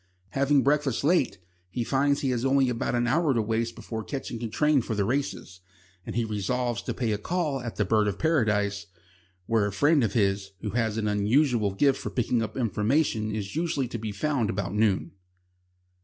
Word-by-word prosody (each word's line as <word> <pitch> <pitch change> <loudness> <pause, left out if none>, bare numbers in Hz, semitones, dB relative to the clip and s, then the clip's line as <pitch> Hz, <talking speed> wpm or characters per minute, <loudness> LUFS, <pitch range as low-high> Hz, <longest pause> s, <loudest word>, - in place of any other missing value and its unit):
Having 140 +3 +2
breakfasted 145 -2 +1
late, 160 -2 +2 0.3
he 120 +6 -2
finds 140 +3 +1
he 135 - 0
has 120 -1 -1
only 135 -1 +3
about 120 0 -1
an 120 0 +1
hour 145 +2 +2
to 115 - +2
waste 115 +2 -1
before 110 -1 -6
catching 125 -2 -5
a 115 - -2
train 150 +3 +2
for 110 - -3
the 100 -1 +1
races, 120 -7 -3 0.5
and - - -5
he 120 -1 +1
resolves 120 +3 -1
to - - -4
pay 120 -4 -1
a 105 - -1
call 155 0 -1
at 115 -2 -6
the - - 0
"Bird 110 -2 +2
of 100 - -2
Paradise," 105 -10 +1 0.6
where 110 0 +2
a - - -3
friend 145 +7 +3
of 110 - 0
his 100 -3 0
who 105 - -3
has 115 -1 0
an 110 -1 -1
unusual 105 0 +2
gift 140 +5 +3
for - - -4
picking 120 -1 0
up 110 +1 -4
information 115 - +1
is 100 +1 -5
usually 160 -5 0
to 115 - -5
be 110 -1 -4
found 120 +1 -1
about 100 -1 -2
noon. 105 -2 +1
115 Hz, 200 wpm, -27 LUFS, 105-135 Hz, 0.6 s, only